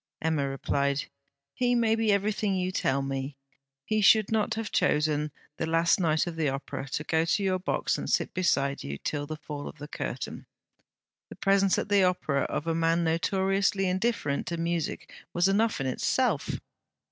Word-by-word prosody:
Emma 155 -4 0
replied: 140 +1 0 0.5
'He 245 -1 +1
may 230 -2 +3
be 225 -1 +2
everything 200 0 +1
you 185 0 -1
tell 140 -6 0
me. 135 0 -4 0.5
He 215 0 +1
should 215 +1 +5
not 220 0 +1
have 225 -1 -4
chosen 150 0 +1 0.3
the 160 - -2
last 165 +2 +3
night 160 -3 +2
of 175 -2 -5
the 160 -3 +1
Opera 135 0 -5
to 150 - -1
go 160 +1 +1
to 170 +5 +1
your 185 -1 +1
box 180 - -1
and - - -4
sit - - +1
beside 140 -6 +1
you 70 0 -5
till 145 - -3
the 155 0 -5
fall 150 -1 -7
of - - -9
the 150 - -8
curtain. - - -5 0.8
The - - -9
presence 195 -1 +3
at - - -2
the 200 -1 +4
Opera 165 -6 +1
of 150 - -3
a 165 - 0
man 165 +1 +2
notoriously 195 +4 +1
indifferent 185 -6 -1
to 170 - -2
music 170 -1 -2 0.3
was 175 +2 +4
enough 215 +3 +2
in 135 - -2
itself.' 130 - 0
170 Hz, 180 wpm, -28 LUFS, 150-195 Hz, 0.8 s, should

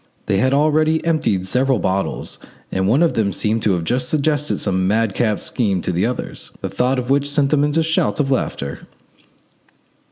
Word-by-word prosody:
They 95 - +1
had 130 +6 +2
already 155 +3 +2
emptied 145 - +1
several 130 +6 +2
bottles, 95 0 -2 0.3
and 95 0 0
one 130 +11 +3
of 170 - +2
them 105 -3 0
seemed 110 +4 0
to 105 - +2
have 85 -2 -1
just 125 +7 -1
suggested 150 -1 0
some 95 -2 0
madcap 110 0 +1
scheme 100 -6 -1
to - - -1
the 90 +5 +1
others, 125 - -5
the - - -3
thought 130 +2 0
of 125 +1 -2
which 140 +1 +2
sent 145 -1 +1
them 150 - +3
off - - +3
into 150 +2 +1
shouts 160 -1 0
of 140 -2 +1
laughter. 70 - -3
125 Hz, 190 wpm, -19 LUFS, 100-145 Hz, 0.3 s, one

